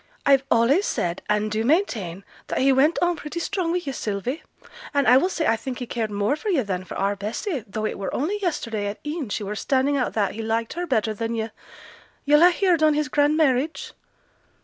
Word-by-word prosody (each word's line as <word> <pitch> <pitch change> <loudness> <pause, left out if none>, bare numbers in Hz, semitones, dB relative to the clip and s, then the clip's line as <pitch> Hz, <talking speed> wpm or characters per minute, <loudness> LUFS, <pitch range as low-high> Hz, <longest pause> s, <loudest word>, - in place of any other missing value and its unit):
I've 275 -1 +5
allays 265 - +3
said 175 +1 -2
and 210 0 +1
do 215 +1 0
maintain, 225 - 0 0.2
that - - -3
he 270 +1 +4
went 290 +5 +3
on 350 0 +2
pretty 300 +2 -6
strong 365 -1 -2
wi' 355 +1 0
yo', 275 - -2
Sylvie; 230 - -3 0.5
and 280 -2 +2
I 250 - +8
will 360 +8 +2
say 335 -3 -2
I 225 - +3
think 245 +3 -6
he 250 - -4
cared 230 -2 -3
more 205 +5 0
for 420 +8 -5
yo' 315 -10 +2
than 185 -3 -3
for - - -7
our 200 +1 0
Bessy, 225 - -3
though 215 +2 -3
it - - -3
were 195 - -3
only 375 +10 -1
yesterday 230 - -2
at 205 - -4
e'en 295 -5 -3
she 210 - -3
were 200 +1 -4
standing 270 +5 +1
out 250 - -1
that 205 -4 +1
he 225 - -5
liked 225 +1 -1
her 350 +1 -4
better 220 -6 +1
than 230 +2 -3
yo'. 220 0 -3 0.7
Yo'll 295 +2 +5
ha' - - 0
heared 355 -3 +2
on 310 -1 +4
his 300 0 0
grand 295 +1 +2
marriage?' 295 0 +1
260 Hz, 225 wpm, -24 LUFS, 215-305 Hz, 0.7 s, I